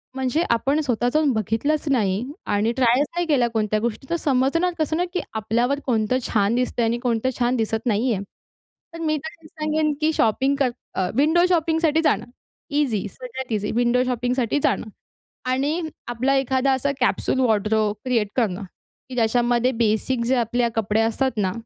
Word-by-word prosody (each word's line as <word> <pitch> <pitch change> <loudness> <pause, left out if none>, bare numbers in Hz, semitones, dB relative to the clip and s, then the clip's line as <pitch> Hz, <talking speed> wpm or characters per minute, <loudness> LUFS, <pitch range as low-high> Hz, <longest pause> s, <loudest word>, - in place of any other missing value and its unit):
म्हणजे 265 +4 0
आपण 270 +6 +2
स्वतः 245 -4 0
जाऊन 305 -2 +3
बघितलंच 225 - -1
नाही 205 -5 +1 0.2
आणि 210 +3 +1
ट्रायच 255 +2 +4
नाही 350 0 0
केल्या 265 -6 +3
कोणत्या 215 -2 0
गोष्टी, 235 +4 -3
तर 340 - +1
समजणार 310 +4 +1
कसं 315 0 0
ना, 355 - +1
की 360 - 0
आपल्यावर 235 +5 0
कोणतं 230 -1 +1
छान 210 +1 +1
दिसतंय 245 -1 0
आणि 230 +1 0
कोणतं 240 0 0
छान 245 +1 +2
दिसत 225 0 -1
नाही 230 +3 +2
आहे. 200 -1 -3 0.7
तर 335 - -8
मी 310 -1 +1
तसे 320 0 -10
सांगेन, 305 -1 -1
की 310 +1 +3
शॉपिंग 265 +3 +2
कर 270 -2 +3 0.3
अ, 185 -1 0
विंडो 320 +6 +4
शॉपिंगसाठी 320 -2 +2
जाणं - - +2 0.4
इझी, 270 -9 0
सगळ्यात 255 +2 -8
इझी 210 0 -1
विंडो 245 +1 +3
शॉपिंगसाठी 250 +1 0
जाणं. - - +1 0.6
आणि 275 +6 0 0.3
आपला 250 +3 +1
एखादा 270 0 +1
असा 265 +2 0
कॅप्सूल 255 +1 +1
वॉर्डरोब 215 -3 +2
क्रिएट 235 -5 +1
करणं, 210 -5 0 0.5
की 255 - -7
ज्याच्यामध्ये 240 +1 +2
बेसिक 225 +3 0
जे 260 +2 +2
आपले 235 0 +1
कपडे 220 0 +1
असतात 230 +4 +1
ना, 190 -3 +1
250 Hz, 165 wpm, -23 LUFS, 225-285 Hz, 0.7 s, ट्रायच